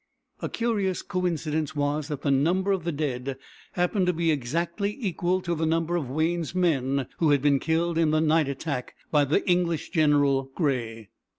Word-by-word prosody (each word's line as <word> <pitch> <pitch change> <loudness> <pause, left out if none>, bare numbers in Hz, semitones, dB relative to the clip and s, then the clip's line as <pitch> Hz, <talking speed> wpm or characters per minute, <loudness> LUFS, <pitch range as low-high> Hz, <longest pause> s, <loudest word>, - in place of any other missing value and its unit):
A - - -2
curious 210 -6 -1
coincidence 160 -4 -2
was 145 +1 -1
that 145 -3 -5
the 140 - +2
number 175 +8 +2
of 190 -4 -1
the 170 - 0
dead 135 -3 -3 0.4
happened 180 +1 +1
to 180 - +3
be 165 0 +1
exactly 170 - -2
equal 185 -4 0
to 175 -1 -2
the 160 -1 -1
number 165 +1 0
of 150 -7 -2
Wayne's 165 +4 -1
men 140 -7 +1
who 160 - +3
had 145 -2 +3
been 140 -2 +4
killed 165 +2 0
in 165 -2 +3
the 155 0 +2
night 160 -1 +3
attack 140 -2 -4 0.2
by 150 -2 +4
the 155 +10 0
English 175 -3 +1
general, 145 -5 +3
Grey. 115 - -2
160 Hz, 180 wpm, -26 LUFS, 140-175 Hz, 0.4 s, been